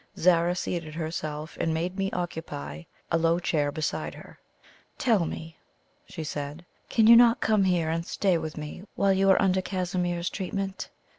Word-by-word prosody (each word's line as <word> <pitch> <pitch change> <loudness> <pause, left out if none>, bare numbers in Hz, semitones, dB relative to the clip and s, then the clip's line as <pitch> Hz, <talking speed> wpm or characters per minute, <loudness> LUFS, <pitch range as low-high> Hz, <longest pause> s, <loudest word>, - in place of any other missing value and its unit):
Zara 175 0 +3
seated 165 -3 -4
herself, 155 -1 -4
and 160 -1 0
made 175 +3 -2
me 195 0 -1
occupy 80 - -5 0.3
a 165 - +3
low 165 +1 +3
chair 150 -4 0
beside 155 0 -3
her. - - -13 0.6
"Tell 220 - +2
me," 160 0 -7 0.5
she 165 -4 -6
said, 145 +2 -5 0.2
"can 225 - +3
you 230 +1 +9
not 235 0 +6
come 215 -3 +3
here 175 -4 +1
and 165 +1 -1
stay 185 0 +1
with 155 -1 -6
me 150 +3 -6
while 195 -1 +3
you 195 +1 +3
are 190 - +6
under 190 -1 +2
Casimir's 180 -2 -2
treatment?" 195 0 -4
175 Hz, 165 wpm, -27 LUFS, 160-190 Hz, 0.6 s, you